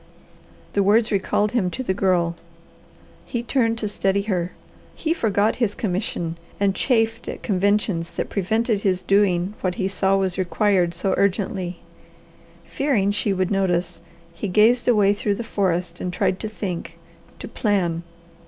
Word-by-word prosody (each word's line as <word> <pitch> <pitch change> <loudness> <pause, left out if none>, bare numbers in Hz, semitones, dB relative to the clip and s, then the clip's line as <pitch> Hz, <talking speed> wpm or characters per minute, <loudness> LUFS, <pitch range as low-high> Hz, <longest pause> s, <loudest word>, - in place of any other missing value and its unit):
The 200 - +2
words 220 +4 +3
recalled 205 +1 +1
him 220 -7 +1
to 260 - -4
the 190 - 0
Girl. 180 -3 +1 0.9
He 240 -1 -4
turned 230 -2 +1
to 220 - -2
study 200 -1 0
her. 180 -4 -1 0.4
He 320 - 0
forgot 215 - +1
his 230 -5 0
commission 180 -4 -2 0.2
and 200 -1 +2
chafed 225 -1 0
at - - -7
conventions 200 -3 +1
that - - -4
prevented 220 +2 0
his 185 -2 0
doing 195 -2 +2
what 180 -1 -1
he 190 - -1
saw 195 0 +1
was 190 -1 -1
required 185 -2 +1
so 190 +3 0
urgently. 190 -2 -1 0.8
Fearing 230 -9 +1
she 205 0 0
would 185 -1 0
notice, 185 -4 0 0.3
he 170 +5 -4
gazed 220 +6 +4
away 205 -4 +4
through 205 0 -1
the 235 - -4
forest 180 -5 -1
and 180 - -2
tried 180 +1 0
to 215 - -4
think, 190 -5 -5 0.4
to - - -7
plan. 180 -6 0
195 Hz, 155 wpm, -23 LUFS, 180-215 Hz, 0.9 s, gazed